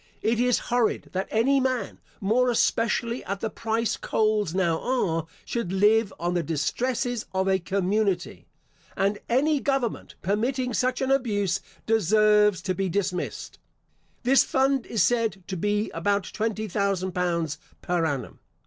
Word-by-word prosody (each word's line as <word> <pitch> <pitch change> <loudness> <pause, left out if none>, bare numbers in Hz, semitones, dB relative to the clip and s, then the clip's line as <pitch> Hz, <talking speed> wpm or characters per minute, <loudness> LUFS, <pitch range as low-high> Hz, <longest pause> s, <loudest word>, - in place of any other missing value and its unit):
It 225 +1 +1
is 250 0 +3 0.2
horrid 245 -2 +1
that 190 +1 -2
any 265 +5 +3
man, 260 -2 -1 0.2
more 235 +5 +2
especially 235 +1 +1
at 200 +1 -3
the 220 0 -3
price 225 0 -1
coals 215 -5 0
now 170 -4 +1
are, 165 -11 -1 0.2
should 235 -7 -3
live 210 +2 +3
on 175 +1 -1
the 175 - +1
distresses 230 - -1
of 190 0 +1
a 190 0 +3
community; 195 0 -1 0.5
and 200 +1 +1
any 285 +5 +2
government 270 -5 -2
permitting 245 +6 0
such 255 +4 0
an 265 0 +1
abuse, 205 -9 +1 0.3
deserves 210 -1 +3
to 185 - 0
be 195 0 -1
dismissed. 180 -1 -3 0.6
This 265 +2 +5
fund 270 -1 +1
is 220 -6 +1
said 225 -5 +1
to 190 - -5
be 205 +4 0
about 200 +4 0
twenty 220 0 -2
thousand 195 -1 -1
pounds 170 -4 -1 0.2
per 175 -1 0
annum. 145 -5 -3
210 Hz, 145 wpm, -26 LUFS, 185-240 Hz, 0.6 s, This